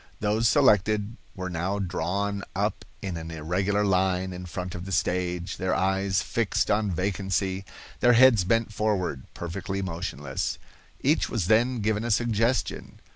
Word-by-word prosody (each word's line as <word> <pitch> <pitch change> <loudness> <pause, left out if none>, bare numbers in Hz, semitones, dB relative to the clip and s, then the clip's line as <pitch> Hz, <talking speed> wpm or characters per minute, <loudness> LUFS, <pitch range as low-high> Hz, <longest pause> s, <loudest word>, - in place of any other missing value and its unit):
Those 110 +2 +2
selected 105 -4 +3 0.2
were 95 -1 -4
now 90 +3 -2
drawn 100 +2 -2
up - - -1 0.2
in 95 -4 -3
an 80 0 -6
irregular 95 +6 0
line 95 -1 +1
in 90 0 -7
front 90 +1 -5
of 90 +1 -6
the 95 - -6
stage, 90 -1 -1
their 95 0 0
eyes 95 0 +1
fixed 115 -4 0
on 105 0 +2
vacancy, 95 +1 -1 0.3
their 120 - +5
heads 120 -4 +6
bent 115 +2 +1
forward, 95 -11 -1
perfectly 95 +3 -4
motionless. 80 -7 -3 0.4
Each 150 +4 +2
was 110 -7 -1
then 120 +4 +3
given 105 +1 0
a 120 - -2
suggestion. 115 +2 0
95 Hz, 145 wpm, -26 LUFS, 90-105 Hz, 0.4 s, heads